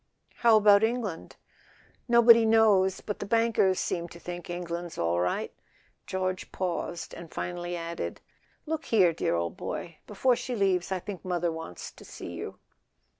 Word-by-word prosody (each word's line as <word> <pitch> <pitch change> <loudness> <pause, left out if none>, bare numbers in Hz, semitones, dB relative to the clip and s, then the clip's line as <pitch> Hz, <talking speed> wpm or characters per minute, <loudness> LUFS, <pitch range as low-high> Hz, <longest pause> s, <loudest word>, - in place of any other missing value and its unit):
"How 230 -2 +6
about 205 0 +6
England?" 225 -7 -2 0.7
"Nobody 235 -1 +7
knows; 215 -4 +4
but 205 - -5
the - - -4
bankers 225 -4 +2
seem 170 -1 -2
to 170 - -12
think 175 0 -7
England's 175 -1 -5
all 85 +1 +1
right." 90 0 -1 0.5
George 185 0 -3
paused, 175 -2 -3
and 170 -2 -10
finally 175 0 -4
added: 170 0 -5 0.5
"Look 320 0 -3
here, 185 -7 +4
dear 155 - 0
old 85 0 -2
boy—before 210 +9 -1
she 250 - -4
leaves 190 -4 +1
I 190 - +1
think 185 +1 -7
mother 175 -2 -1
wants 160 - -7
to - - -15
see - - -8
you." - - -7
185 Hz, 150 wpm, -28 LUFS, 170-220 Hz, 0.7 s, Nobody